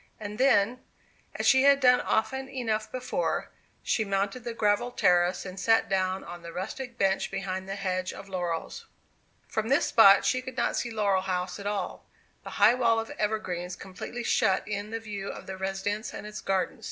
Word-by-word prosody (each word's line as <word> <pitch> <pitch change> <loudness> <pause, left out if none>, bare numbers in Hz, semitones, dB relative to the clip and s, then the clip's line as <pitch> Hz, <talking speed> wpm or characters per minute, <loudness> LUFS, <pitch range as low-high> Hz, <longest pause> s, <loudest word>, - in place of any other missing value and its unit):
And 210 +1 -7
then, 250 -2 +3 0.6
as - - -3
she 265 -1 +6
had 280 0 +6
done 250 -2 +5
often 265 +5 -1
enough 220 -5 -2
before, 255 - -2 0.3
she 220 - +1
mounted 200 +4 -1
the 235 -1 -5
gravelled 225 +3 +1
terrace, 180 +1 +3
and 185 0 -7
sat 225 +3 +3
down 190 -1 0
on 175 0 -9
a 170 - -8
rustic 235 +8 -6
bench 195 -2 +1
behind 190 -1 -4
the 195 - -3
hedge 185 -2 -2
of 195 - -10
laurels. 175 -4 -4 0.6
From 220 +1 -2
this 275 - +3
spot 200 -3 +7
she 255 - +2
could 260 0 -9
not - - +1
see 240 - -1
Laurel 205 -4 +1
House 180 0 -3
at 200 - -5
all. 205 -2 -4 0.4
The - - -7
high 210 +3 +6
wall 230 -2 +2
of 225 - -5
evergreens 185 -5 -2
completely 200 +5 -7
shut 190 -4 +2
in 205 0 -4
the 225 +1 -3
view 205 -3 -6
of - - -8
the 190 - -6
residence 195 +3 -3
and - - -7
its 210 0 -7
garden. 190 -1 -1
205 Hz, 190 wpm, -28 LUFS, 190-230 Hz, 0.6 s, spot